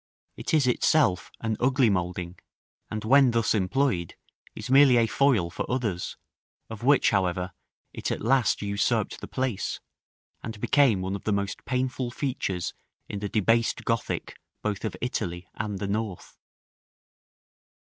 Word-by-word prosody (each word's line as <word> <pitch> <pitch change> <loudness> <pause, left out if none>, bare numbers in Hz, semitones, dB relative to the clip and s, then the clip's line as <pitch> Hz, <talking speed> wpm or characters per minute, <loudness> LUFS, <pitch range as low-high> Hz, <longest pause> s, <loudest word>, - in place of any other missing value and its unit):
It - - -5
is 150 -3 +4
itself 125 -5 +2
an 110 -1 -1
ugly 130 0 +3
moulding, 90 -2 -2 0.5
and, 110 0 -4
when 135 +3 +6
thus 115 -2 +1
employed, 100 - 0 0.4
is 110 - -6
merely 135 -2 +7
a 115 - +4
foil 115 -7 +2
for - - -4
others, 110 -9 -2 0.5
of 110 - -7
which, 140 +3 +4
however, 90 -2 0 0.4
it - - -3
at - - -2
last 125 -2 +2
usurped 100 0 0
the - - -6
place, 130 -6 -2 0.6
and 110 -2 -7
became 125 -6 +3
one 95 +1 -2
of 100 - -8
the 110 - +1
most 100 -1 -2
painful 130 -1 -1
features 120 -9 -3 0.3
in 100 - -5
the 100 0 -3
debased 115 +3 +1
Gothic 115 -1 -2 0.2
both 105 -2 -2
of 110 - -4
Italy 90 -7 -3
and 105 -2 -4
the 100 - -3
North. 105 -2 -4
110 Hz, 145 wpm, -27 LUFS, 95-125 Hz, 0.6 s, merely